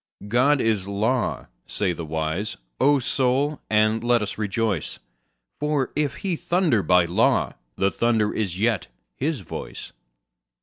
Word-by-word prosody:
God 130 +6 +3
is 105 -5 +1
law, 110 +5 0 0.2
say 95 -4 0
the 85 0 -6
wise; 80 +6 -2 0.2
O 145 +1 +5
Soul, 135 +3 0
and 110 +1 +2
let 120 -2 +3
us 100 - -4
rejoice, 105 -4 -1 0.6
For 150 -3 0
if 150 -1 0
He 185 -3 +1
thunder 165 - +1
by 90 -2 +4
law 85 - +2 0.2
the 95 +6 +1
thunder 115 -3 +1
is 95 -4 -2
yet 110 -1 +1 0.3
His 145 -3 -2
voice. 85 - -8
110 Hz, 135 wpm, -24 LUFS, 100-135 Hz, 0.6 s, O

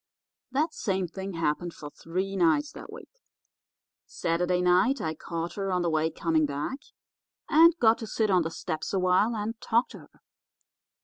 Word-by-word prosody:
That 300 +5 0
same 190 -2 -1
thing 190 +3 -6
happened 165 +1 -2
for 145 -1 -9
three 185 +6 -4
nights 195 - +2
that - - -11
week. - - -13 0.9
Saturday 180 +2 0
night 180 +10 +3
I 160 -1 -2
caught 165 +2 -5
her 195 -1 -3
on 180 -1 +1
the 170 - 0
way 160 0 +1
coming 160 -1 0
back, 145 - -4 0.7
and 330 +2 +6
got 230 -5 +4
to 225 - -6
sit 215 -1 0
on 180 -1 +4
the 165 - -2
steps 160 +1 -5
a 195 - +2
while 185 +5 +2
and 220 +2 -4
talk 235 +2 +1
to - - -11
her. - - -20
185 Hz, 175 wpm, -27 LUFS, 165-225 Hz, 0.9 s, and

